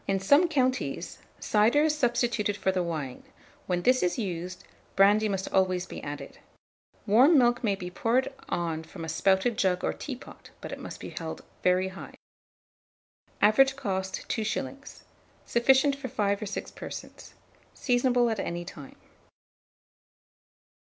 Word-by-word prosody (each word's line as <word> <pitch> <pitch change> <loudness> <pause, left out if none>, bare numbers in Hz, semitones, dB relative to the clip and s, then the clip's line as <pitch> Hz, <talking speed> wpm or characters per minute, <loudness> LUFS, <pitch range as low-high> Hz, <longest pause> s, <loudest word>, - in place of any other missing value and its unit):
In 195 0 +1
some 285 - +5
counties, 260 -5 -1 0.2
cider 225 +8 +3
is 310 -1 +2
substituted 240 -6 0
for 190 - +1
the 185 -1 0
wine: 155 -7 -4 0.5
when 180 -1 -1
this 255 +1 +4
is 175 -1 0
used, 180 -3 -4 0.3
brandy 205 +2 +5
must 195 -1 -2
always 185 -1 +2
be - - -8
added. 145 0 -7 0.7
Warm 255 +10 +6
milk 240 -1 +3
may 205 -3 +2
be 180 -2 -7
poured 245 +8 0 0.2
on 165 -2 -2
from 165 +1 -9
a - - -7
spouted 190 +7 +1
jug 180 -2 +1
or - - 0
teapot; 270 -2 -9
but - - -8
it - - -6
must - - -8
be - - -7
held - - -6 0.2
very 185 +1 +2
high. 190 - -10 1.3
Average 265 +6 +5
cost, 190 -3 -3
2s. 270 +5 -4 0.4
Sufficient 265 +4 +3
for 275 -1 -6
5 205 -4 -1
or - - -3
6 195 - -5
persons. - - -9 0.4
Seasonable 245 -1 +2
at 220 - -2
any 175 0 -3
time. 145 -5 -10
205 Hz, 145 wpm, -28 LUFS, 185-250 Hz, 1.3 s, Warm